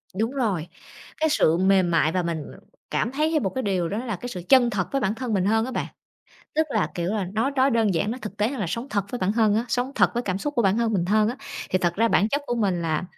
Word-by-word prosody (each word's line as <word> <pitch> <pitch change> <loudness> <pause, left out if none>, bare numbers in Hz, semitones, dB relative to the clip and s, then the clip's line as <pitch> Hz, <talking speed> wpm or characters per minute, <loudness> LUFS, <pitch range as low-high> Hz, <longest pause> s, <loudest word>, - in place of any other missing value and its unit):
Đúng 225 +5 0
rồi, 205 - -1 0.5
cái 315 0 +1
sự 165 - +3
mềm 190 -1 +3
mại 160 -1 +3
và 180 -1 0
mình, 165 -3 -3
ừm, - - -14 0.3
cảm 235 - 0
thấy 305 +3 +1
thêm 310 -8 +1
một 190 - +1
cái 260 +8 -3
điều 185 -5 -1
đó 205 - -3
là 225 -5 -2
cái 245 +7 -7
sự 180 - -6
chân 255 -3 +6
thật 190 -4 -2
với 275 - 0
bản 210 +1 0
thân 250 -3 -3
mình 190 -1 +1
hơn 225 +2 +2
á 260 - -5
bạn. - - -2 0.7
Tức 315 +1 +2
là, 215 - +1
kiểu 170 -1 -2
là, 205 -3 -1
nói 225 +6 +1
nói 265 +1 +4
đơn 225 -5 +2
giản, 185 +6 0
nó 245 - -4
thực 210 -1 -7
tế 210 +2 +1
hơn 270 -3 -5
là 195 - -1
sống 230 +9 -3
thật 200 -2 0
với 245 - -3
bản 190 +2 0
thân 215 -2 +3
á, 225 +2 +1
sống 250 +3 -1
thật - - +3
với 240 - 0
cảm 190 -4 -2
xúc 290 +7 -3
của 235 - +2
bản 195 +2 +3
thân 230 -1 +1
mình 175 -4 +1
hơn 215 +2 +3
á. 245 - -3 0.3
Thì 185 - +2
thật 175 -1 0
ra 230 +4 +2
bản 205 +1 +3
chất 285 +4 -1
của 240 - -1
mình 190 -7 0
là, 160 +1 -1
215 Hz, 300 wpm, -24 LUFS, 185-245 Hz, 0.7 s, chân